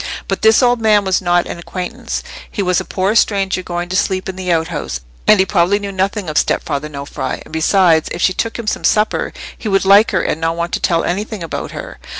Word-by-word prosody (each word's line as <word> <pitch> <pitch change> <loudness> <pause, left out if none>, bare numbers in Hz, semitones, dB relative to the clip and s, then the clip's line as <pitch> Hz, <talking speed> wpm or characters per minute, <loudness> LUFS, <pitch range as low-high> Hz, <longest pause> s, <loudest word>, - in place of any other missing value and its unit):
But - - -2
this 220 +3 +5
old 245 -1 +3
man 210 -2 +4
was 190 0 +1
not 175 -1 +2
an - - -6
acquaintance; 180 +1 -5 0.3
he 205 - -2
was 180 -1 +1
a - - -8
poor 190 +2 0
stranger 195 -4 +2
going 175 -1 -4
to 185 - -2
sleep 185 -1 0
in 190 - -4
the 185 -1 -2
outhouse, 160 - -2 0.3
and 215 - +6
he 190 - +4
probably 190 +1 +2
knew 200 -1 -5
nothing 195 +1 -1
of 155 - +2
stepfather 150 0 -1
Nofri; 140 -1 -5
and, - - -15
besides, 160 0 +3
if 170 - -4
she 185 - +2
took 230 +4 -2
him 235 - -6
some 215 - -2
supper, 210 +1 +1 0.2
he 220 - -5
would 195 -1 +2
like 200 +3 +6
her, - - 0
and 160 - -2
not 165 0 0
want 170 0 -3
to - - -1
tell 165 -1 +1
anything 205 +1 -3
about 165 - -5
her. - - -8
185 Hz, 230 wpm, -17 LUFS, 170-205 Hz, 0.3 s, and